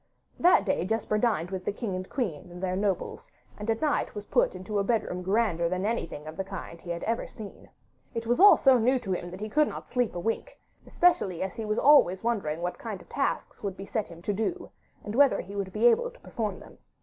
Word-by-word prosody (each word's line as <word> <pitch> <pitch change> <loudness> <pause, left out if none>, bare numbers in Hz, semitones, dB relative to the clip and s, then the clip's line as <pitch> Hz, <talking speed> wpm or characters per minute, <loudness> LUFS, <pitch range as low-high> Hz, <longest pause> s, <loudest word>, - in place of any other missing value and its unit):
That 350 - +5
day 190 -4 +1
Jesper 215 +1 0
dined 205 -7 0
with 190 -1 -4
the - - -1
king 205 -2 -4
and 185 0 -5
queen 190 - -3
and 180 +1 -9
their 185 -1 0
nobles, 195 -2 -2 0.3
and 210 +2 -6
at 225 0 0
night 300 -7 0
was 205 0 -6
put - - +2
into 190 +3 -3
a - - +2
bedroom 200 -4 -1
grander 185 -3 +1
than 185 +2 -1
anything 185 -9 -3
of 155 +1 -8
the 195 - -1
kind 190 -3 -8
he 175 - -10
had 170 0 -3
ever 230 +1 -1
seen. 215 -3 -11 0.5
It 230 0 -3
was 240 +5 +1
all 405 +2 +9
so 265 -3 +5
new 255 +4 +3
to 230 -6 -5
him 175 -1 -2
that 185 +3 -9
he 215 - -3
could 300 +7 +3
not - - -7
sleep 245 -5 0
a - - -2
wink, 225 - -3 0.3
especially 345 - +2
as 190 - -4
he 225 -2 -5
was 215 +1 -1
always 245 -11 +5
wondering 185 -9 -1
what 180 - -3
kind 215 -5 -5
of - - -17
tasks 275 - -2
would 195 -2 -4
be 195 - -7
set 215 +1 -2
him 170 0 -13
to 205 - -1
do, 280 - -3 0.3
and 210 - -5
whether 275 +2 +5
he 200 +2 -7
would 195 -2 -3
be 215 +4 0
able 240 - +5
to - - -18
perform 210 -4 -4
them. - - -15
205 Hz, 245 wpm, -28 LUFS, 185-235 Hz, 0.5 s, all